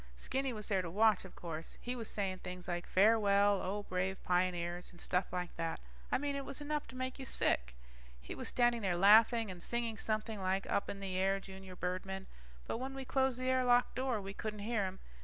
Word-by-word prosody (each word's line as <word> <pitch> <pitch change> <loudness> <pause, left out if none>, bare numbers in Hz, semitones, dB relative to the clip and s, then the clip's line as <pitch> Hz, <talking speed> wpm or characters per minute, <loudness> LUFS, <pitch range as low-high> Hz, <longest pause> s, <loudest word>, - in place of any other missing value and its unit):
Stinky 265 - -1
was 215 -3 -5
there 195 -3 +2
to 175 - -5
watch, 210 +2 +4
of 190 - -12
course. 165 -2 -6
He 245 +1 -4
was 230 -3 -4
saying 190 -3 -2
things 180 -1 -7
like, 175 -1 -3
farewell, 205 -1 +4
O 205 +2 -2
brave 185 0 -2
pioneers, 175 -1 0
and 175 - -16
stuff 180 +1 0
like 180 -1 -3
that. 165 -1 -2 0.3
I - - +4
mean 285 +1 -2
it 280 - -2
was 270 - -5
enough 295 0 -2
to - - -11
make 255 +1 -3
you 265 - -5
sick. 60 - +1 0.4
He - - -7
was - - -5
standing 240 -1 +3
there 185 -4 +1
laughing 220 +3 +6
and 180 -1 -9
singing 230 0 -2
something 215 -1 -2
like 190 +1 0
up 200 - 0
in 200 - -5
the 190 -2 -3
air 195 +1 +2
junior 190 -1 -10
birdmen, 185 +2 -3 0.4
but - - -3
when 265 +1 -4
we 270 -1 -5
closed 265 -1 +1
the 255 - -3
air 260 0 +3
lock 245 0 +4
door, 255 -3 0
we 195 0 -6
couldn't 210 0 -5
hear 220 -3 +1
him. 185 +1 -7
200 Hz, 220 wpm, -35 LUFS, 185-240 Hz, 0.4 s, laughing